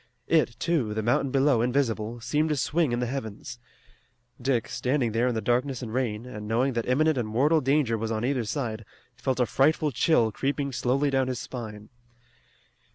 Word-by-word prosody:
It, 155 -8 +2
too, 140 -11 0
the 110 - -1
mountain 120 +4 +1
below 135 -2 +3
invisible, 120 -3 0
seemed 150 +6 0
to 150 - +1
swing 150 +1 +1
in 120 - 0
the - - +1
heavens. 120 -2 -6 0.8
Dick, 125 -3 0
standing 125 -3 0
there 115 +3 +1
in 125 - 0
the 110 - -1
darkness 125 +2 0
and 110 -2 -6
rain, 120 -3 -1
and 105 -4 -7
knowing 125 +5 +1
that 115 -1 -2
imminent 155 +2 +3
and 115 - -2
mortal 145 +8 +3
danger 135 -4 +1
was 110 0 -2
on 110 +1 -1
either 130 -2 0
side, 110 -2 -3 0.3
felt 130 -1 -2
a 125 - +4
frightful 150 +4 +2
chill 120 -3 +3
creeping 140 +4 -2
slowly 135 +3 +1
down 135 -1 +1
his 130 -1 -2
spine. 110 -4 -7
125 Hz, 185 wpm, -27 LUFS, 115-140 Hz, 0.8 s, a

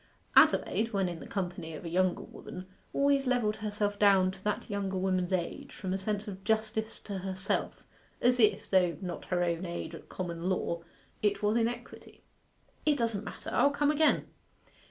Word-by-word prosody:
Adelaide, 225 +1 +5
when 195 -2 +2
in 175 -2 -5
the - - -9
company 175 -4 -4
of 155 - -9
a - - -3
younger 185 +1 +1
woman, 185 - -9 0.3
always 280 -1 +2
levelled 235 -4 +1
herself 205 -1 -2
down 195 -2 +5
to 190 0 -13
that 210 - -1
younger 200 -2 -2
woman's 185 -1 0
age 180 -2 -2
from 185 -2 -4
a - - +1
sense 210 +2 -2
of 190 -1 -7
justice 220 0 0
to 200 -2 -5
herself 190 0 -2 0.4
as 250 +1 +3
if, 215 -3 +3
though 180 -3 +3
not 180 -3 -5
her 175 -1 +1
own 170 0 0
age 170 -1 -4
at - - -10
common 175 -1 -3
law, 170 -2 -1 0.4
it 205 -1 +1
was 210 +1 +3
in 230 -1 +3
equity. 240 - -8 0.6
'It 300 -2 +3
doesn't 230 -4 0
matter. - - -7
I'll 285 - +5
come 290 +1 +2
again. 305 +1 +3
200 Hz, 180 wpm, -31 LUFS, 185-220 Hz, 0.6 s, Adelaide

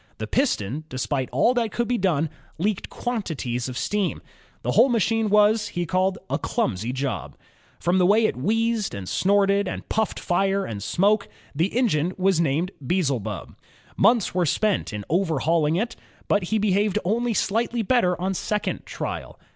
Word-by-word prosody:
The - - -4
piston, 150 - 0
despite 130 +1 -2
all 145 - +3
that 235 -3 0
could 240 -1 -1
be 245 -1 0
done, 165 -5 +1 0.3
leaked 195 +4 -1
quantities 155 - -3
of 125 - -6
steam. 205 +2 -1 0.4
The - - 0
whole 270 - +5
machine 225 -1 +1
was 210 +1 +3
a 175 - 0 0.5
"clumsy 115 - -1
job." 135 -1 -4 0.4
From 175 +2 +2
the 180 - +4
way 215 +3 +4
it - - 0
wheezed, 225 - 0
and 95 -2 -6
snorted, 200 - +2
and - - -5
puffed 220 -1 0
fire 195 +2 +1
and 105 -3 -5
smoke, 200 - +2 0.3
the 170 +9 0
engine 185 - +1
was 190 -2 +2
named 165 +4 0
Beelzebub. 130 - -2 0.4
Months 230 -4 +3
were 180 -2 +1
spent 210 - +1
in 105 -2 -5
overhauling 165 -2 +1
him, 225 +6 0 0.4
but 205 -3 +2
he 220 +5 0
behaved 205 0 +1
only 230 +4 0
slightly 230 +4 0
better 185 -6 +2
on 190 +2 -1
second 210 +3 -2
trial. - - -5
190 Hz, 155 wpm, -24 LUFS, 155-215 Hz, 0.5 s, whole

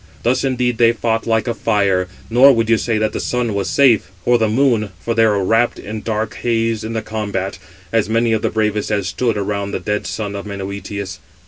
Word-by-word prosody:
Thus 125 +2 +1
indeed 125 -3 0
they 115 0 +5
fought, 115 -1 -1
like 115 +1 +1
a 120 - 0
fire; 100 -4 +1 0.2
nor 125 +4 +6
would 115 -1 +1
you 115 - +5
say 115 -2 0
that 110 0 0
the - - -3
Sun 125 -3 -1
was 100 -1 -1
safe, 130 -9 +3 0.2
or 120 -1 +4
the 110 - +2
Moon, 115 -3 +2
for 115 +5 -2
they 115 0 +4
were 100 -2 +1
wrapt 115 +5 +2
in 110 +1 -6
dark 110 0 -2
haze 115 -2 0
in 110 +1 -4
the 110 -1 -2
combat, 100 -4 -3 0.3
as 110 -2 +1
many 115 0 +2
of 110 - 0
the - - 0
bravest 105 -1 -1
as 100 -3 0
stood 115 +1 -1
around 100 0 -2
the - - -1
dead 105 0 -2
son 105 -2 -4
of 100 +1 -6
Menœtius. 100 0 -6
110 Hz, 220 wpm, -18 LUFS, 100-115 Hz, 0.3 s, nor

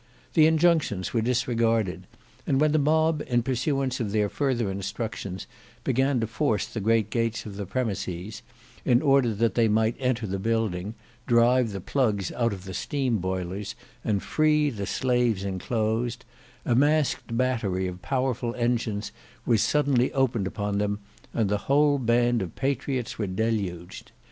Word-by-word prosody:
The 155 - +6
injunctions 160 - +2
were 115 - +2
disregarded, 115 -6 0 0.4
and 135 - +2
when 155 0 +3
the 155 - +3
mob 155 +1 +2
in 120 -1 +1
pursuance 135 +1 -1
of 110 -4 -2
their 105 -1 +1
further 120 -7 0
instructions 95 -1 -5 0.4
began 135 0 +1
to - - +1
force 115 -2 0
the 115 - -6
great 110 0 +2
gates 115 -1 -1
of 105 -2 -7
the 100 -1 -5
premises, 105 -4 -3 0.4
in 125 -1 +3
order 135 -4 +4
that 115 -1 +1
they 115 +1 +3
might 110 +2 +2
enter 125 -3 0
the 95 -1 -3
building, 110 -2 -1 0.3
drive 120 0 +4
the 100 - -4
plugs 105 -6 0
out 115 -1 0
of 95 -2 -7
the 95 - -7
steam 130 0 -1
boilers, 95 +2 -3 0.3
and 100 -3 0
free 150 -1 +2
the 100 -5 -5
slaves 120 -6 +1
enclosed, 110 +5 -2 0.4
a 120 - +2
masqued 145 -3 +2
battery 115 -8 0
of 90 0 -7
powerful 125 -2 -1
engines 120 -3 -1 0.3
was 115 -3 +3
suddenly 140 -4 +2
opened 125 -7 +1
upon 100 +1 -2
them, 105 0 0 0.3
and 110 -3 0
the 105 +1 +1
whole 145 0 +4
band 120 -1 +2
of 90 -3 -5
patriots 135 -3 -2
were 105 - -1
deluged. 95 -4 -3
115 Hz, 155 wpm, -26 LUFS, 100-130 Hz, 0.4 s, The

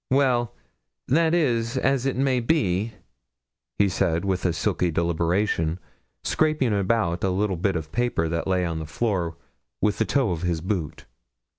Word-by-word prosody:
'Well, 125 -3 +2 0.5
that 165 +4 +3
is 120 -6 +1
as 135 0 +1
it 135 - 0
may 130 -1 +2
be,' 115 - +1 0.8
he 100 - +4
said, 85 -1 0
with 95 -1 -1
a 90 - +3
sulky 85 +3 0
deliberation, 85 +1 0 0.5
scraping 155 -7 +1
about 95 -3 0
a 95 - +2
little 95 +1 0
bit 95 +3 0
of 80 -2 -4
paper 120 -9 0
that 85 +2 -2
lay 90 -1 +1
on 85 -2 -2
the 80 - -6
floor 90 -4 -1 0.4
with 105 -1 +1
the 110 - +3
toe 130 -6 +1
of 85 -2 -3
his 90 -2 0
boot. 90 -3 -3
100 Hz, 160 wpm, -25 LUFS, 85-120 Hz, 0.8 s, he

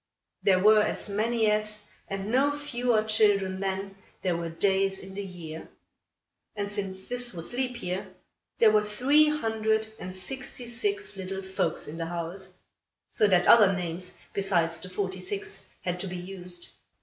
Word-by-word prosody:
There 190 -2 +4
were 210 +3 +6
as 210 - -1
many 220 +1 +2
as, 210 0 0 0.2
and 195 +2 -4
no 285 +3 +3
fewer 245 -6 +1
children 205 -3 +3
than, 195 0 -3 0.3
there 180 -3 +1
were 170 0 -3
days 195 +3 +1
in 190 0 -9
the 200 - -4
year; 165 -4 -8 0.9
and, 205 -1 -2
since 195 -2 -3
this 245 -3 -1
was 170 +6 -4
leap 250 -1 -2
year, 185 +2 -2 0.5
there 220 -2 +6
were 215 0 +4
three 265 +9 +4
hundred 220 -6 +1
and 185 +1 -6
sixty 245 +6 -6
six 400 - -2
little 190 0 -5
folks 190 -4 -1
in 155 - -7
the 165 -1 -3
house; 175 +2 -4 0.5
so 210 - +3
that 180 -3 +4
other 210 -4 +8
names, 180 0 -4 0.2
besides 170 -4 +1
the 185 - -8
forty 185 0 -3
six, 410 - -5 0.2
had 180 0 -2
to 195 - -3
be 180 0 -5
used. 180 -1 -2
195 Hz, 160 wpm, -28 LUFS, 185-220 Hz, 0.9 s, other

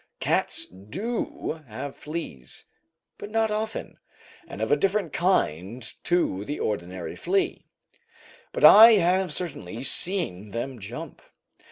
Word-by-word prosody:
Cats - - +1
do 155 - -5
have 130 +5 -7
fleas, 150 - -7 0.5
but 205 - -7
not 220 0 +1
often, 215 +1 -4 0.5
and - - -9
of 110 - -2
a - - +6
different 195 +1 0
kind 120 - 0 0.2
to 170 - +1
the 145 +7 -5
ordinary 90 -3 -4
flea; 385 -1 -1 0.8
but - - +3
I 225 +2 +10
have 185 -2 +2
certainly 130 - -4
seen 135 - +1
them 120 +3 -5
jump. 100 - -8
150 Hz, 120 wpm, -25 LUFS, -, 0.8 s, I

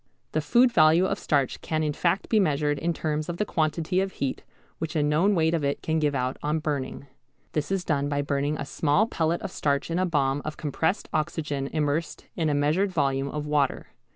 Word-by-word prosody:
The 155 - 0
food 240 +12 +4
value 160 -1 +5
of 195 +1 -1
starch 140 -4 0
can 155 -1 -1
in 150 -1 0
fact 175 +5 0
be 220 - +3
measured 145 -5 +1
in 170 +3 0
terms 155 -1 -2
of 175 - -3
the 210 - 0
quantity 160 +1 0
of 195 0 -3
heat 135 -2 -3 0.4
which 160 +1 -4
a 150 - +2
known 160 +8 +3
weight 160 -1 +2
of 165 -3 0
it 140 0 -1
can 160 0 0
give 150 -2 +1
out 130 0 -1
on 150 +2 0
burning. 145 -3 -3 0.5
This 150 +3 -2
is 190 -2 -1
done 145 -2 0
by 145 0 0
burning 145 +1 -1
a - - -4
small 150 +8 +2
pellet 170 -5 -1
of - - -4
starch 140 0 -1
in 170 - 0
a 185 - +2
bomb 140 -4 +1
of 155 - -5
compressed 160 +5 -1
oxygen 150 -3 -1
immersed 155 +2 -2
in 160 -3 0
a 145 - +1
measured 155 +8 +2
volume 140 -4 0
of 150 +1 -4
water. 145 -2 0
155 Hz, 215 wpm, -26 LUFS, 145-170 Hz, 0.5 s, value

